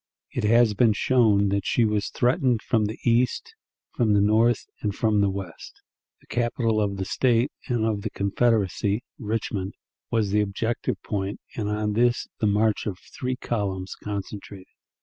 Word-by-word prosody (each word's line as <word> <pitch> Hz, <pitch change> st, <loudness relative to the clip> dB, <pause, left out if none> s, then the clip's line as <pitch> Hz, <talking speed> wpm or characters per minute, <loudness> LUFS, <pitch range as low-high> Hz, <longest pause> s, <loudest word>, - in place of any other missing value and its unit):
It -, -, -2 dB
has 115 Hz, 0 st, +5 dB
been 110 Hz, +1 st, +4 dB
shown 105 Hz, -4 st, +3 dB
that 100 Hz, 0 st, 0 dB
she 115 Hz, -, +2 dB
was 105 Hz, -1 st, 0 dB
threatened 125 Hz, -2 st, +1 dB
from 110 Hz, -3 st, +1 dB
the 110 Hz, +3 st, -4 dB
east, 125 Hz, -, +1 dB, 0.4 s
from 115 Hz, -4 st, +2 dB
the -, -, +5 dB
north, 110 Hz, +3 st, +3 dB, 0.2 s
and 105 Hz, -2 st, -2 dB
from 110 Hz, -2 st, +2 dB
the 100 Hz, -, +3 dB
west. 95 Hz, -3 st, -7 dB, 0.4 s
The -, -, -23 dB
capital 115 Hz, -2 st, 0 dB
of 100 Hz, -1 st, -1 dB
the 95 Hz, -, -2 dB
State 120 Hz, +5 st, +2 dB, 0.2 s
and 120 Hz, -4 st, 0 dB
of 105 Hz, -2 st, 0 dB
the -, -, -3 dB
Confederacy, 100 Hz, 0 st, +1 dB, 0.2 s
Richmond, 105 Hz, -4 st, -3 dB, 0.3 s
was 110 Hz, -4 st, +1 dB
the 105 Hz, +1 st, +3 dB
objective 105 Hz, +3 st, -2 dB
point, 100 Hz, -1 st, -3 dB, 0.2 s
and 105 Hz, -2 st, -2 dB
on 105 Hz, 0 st, -1 dB
this 120 Hz, +2 st, +2 dB
the 110 Hz, -, +2 dB
march 105 Hz, +1 st, +1 dB
of 95 Hz, -4 st, -3 dB, 0.2 s
three 130 Hz, 0 st, -2 dB
columns 100 Hz, -6 st, -3 dB
concentrated. 100 Hz, -1 st, -7 dB
105 Hz, 165 wpm, -25 LUFS, 100-115 Hz, 0.4 s, has